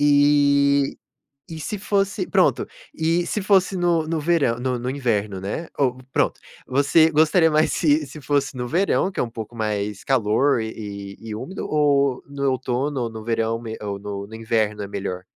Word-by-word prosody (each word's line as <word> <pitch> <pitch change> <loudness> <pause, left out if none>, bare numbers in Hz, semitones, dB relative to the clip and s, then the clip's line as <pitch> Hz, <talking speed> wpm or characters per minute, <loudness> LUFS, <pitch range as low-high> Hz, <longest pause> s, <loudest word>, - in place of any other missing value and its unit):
Eh, 145 -1 +4 0.5
e 160 -1 -7
se 210 +6 -4
fosse, 200 - 0
pronto, - - +2 0.3
e 165 +2 +1
se 210 - -1
fosse 190 -1 +3
no 170 -2 +2
no 165 -1 -1
verã 150 -6 +2
no 125 -1 -1
no 125 +1 -3
inverno, 110 -8 -1
né, 135 - -4
ou, 130 -3 +1
pronto, - - +1 0.3
você 145 +5 +4
gostaria 160 +2 +4
mais 155 +1 +3
se 150 -1 +2
se 150 +2 -10
fosse 140 0 0
no 125 0 -3
verão, 190 +4 +1
que - - -6
é - - +3
um 120 - -4
pouco 115 +1 -7
mais 105 -2 -2
calor 130 +1 +2
e 100 -3 -6
e 110 -1 -7
úmido 185 - -6
ou 140 -3 +2
no 140 -1 -1
outono 130 +2 -1
ou 115 - -2
no 110 -1 -8
verão 115 0 -1
mê 110 -1 -6
ou 100 -1 -4
no 100 0 -6
no 110 - -10
inverno 110 -2 -1
é 100 - -5
melhor, 95 -2 -5
135 Hz, 185 wpm, -22 LUFS, 110-155 Hz, 0.5 s, Eh